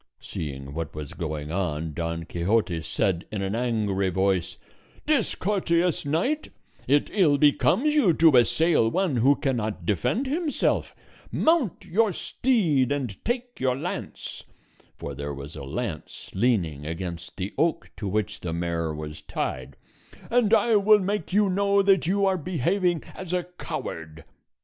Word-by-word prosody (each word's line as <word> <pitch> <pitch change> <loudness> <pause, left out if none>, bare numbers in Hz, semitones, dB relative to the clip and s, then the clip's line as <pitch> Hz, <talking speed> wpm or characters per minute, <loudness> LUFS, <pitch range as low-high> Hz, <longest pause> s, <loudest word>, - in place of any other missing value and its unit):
Seeing 70 -2 -6
what 80 0 -5
was 75 -2 -6
going 80 -3 -4
on, 80 -4 -2
Don 85 +1 -3
Quixote 85 0 0
said 90 +2 -1
in 100 -2 -2
an 95 +1 -2
angry 110 -5 0
voice, 95 -1 0 0.5
"Discourteous 180 - +1
knight, 250 - 0 0.4
it 145 +3 +2
ill 165 -9 +4
becomes 190 - +3
you 285 - +4
to 160 -2 +5
assail 125 +1 +4
one 180 -3 0
who 135 +5 +5
cannot 110 - -2
defend 105 - 0
himself; 300 +3 0 0.4
mount 315 - +1
your 215 +4 +2
steed 165 - +1
and 130 -9 -3
take 245 +1 -3
your 130 -1 +1
lance" - - -5 0.5
(for - - -6
there 70 +1 -5
was 70 +3 -9
a 70 - -7
lance 80 - -5
leaning 95 - +1
against 85 +1 -6
the 95 +1 -4
oak 165 -1 0
to 100 - -4
which 105 0 -1
the 85 -2 -4
mare 85 -1 -1
was 75 0 -7
tied), 65 +1 -4 0.6
"and 235 -3 +3
I 225 0 +5
will 210 +1 +6
make 195 -3 -2
you 205 +2 +4
know 200 +1 +2
that 195 -4 +3
you 200 +2 +2
are 190 -1 +2
behaving 175 +2 0
as 185 -2 -6
a 180 -1 +1
coward." 80 - -7
125 Hz, 145 wpm, -26 LUFS, -, 0.6 s, will